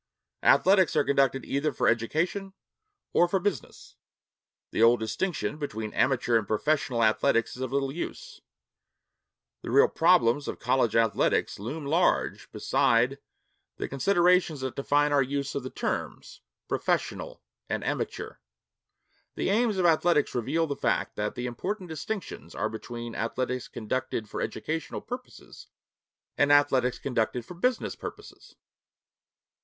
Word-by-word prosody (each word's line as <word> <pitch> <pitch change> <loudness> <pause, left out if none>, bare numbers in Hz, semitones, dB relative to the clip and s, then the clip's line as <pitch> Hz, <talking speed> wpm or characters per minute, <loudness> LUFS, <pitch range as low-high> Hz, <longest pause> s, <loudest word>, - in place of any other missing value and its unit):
Athletics 190 -3 +4
are 150 - +4
conducted 135 -2 +1
either 145 +2 0
for 125 - 0
education 170 - 0 0.6
or 175 - +5
for 195 - +1
business. 200 +1 -4 0.7
The - - -1
old 115 +1 +6
distinction 150 - -2
between 110 -7 -4
amateur 125 -3 +2
and 105 - -7
professional 130 +1 +1
athletics 115 +2 +2
is 125 - -9
of 130 -1 -3
little 135 0 0
use. 475 - -7 1.2
The - - -7
real 445 +3 +6
problems 160 - +3
of - - -4
college 120 -5 +1
athletics 115 -3 +1
loom 140 +9 -5
large 165 +6 +1
beside 125 +4 +2 0.6
the - - -3
considerations 175 +1 +2
that 130 -1 -4
define 145 +1 +2
our 145 -1 +4
use 140 +1 -2
of 140 - -2
the 130 - -6
terms - - -4 0.3
'professional' - - -2 0.3
and - - -2
'amateur.' - - -3 1.0
The - - 0
aims 220 -1 +2
of 185 - +1
athletics 165 -2 +3
reveal 160 +8 0
the 145 -3 -3
fact - - -1
that 105 0 -2
the 125 - -4
important 180 - -4
distinctions 160 - -6
are 110 - -1
between 120 +1 -7
athletics 125 +2 -2
conducted 110 -1 -3
for - - -5
educational 160 +1 -4
purposes 250 +1 -9 0.7
and 145 0 +4
athletics 135 -3 +3
conducted 125 -2 -1
for - - -9
business 245 +8 -1
purposes. - - -10
140 Hz, 135 wpm, -27 LUFS, 120-175 Hz, 1.2 s, old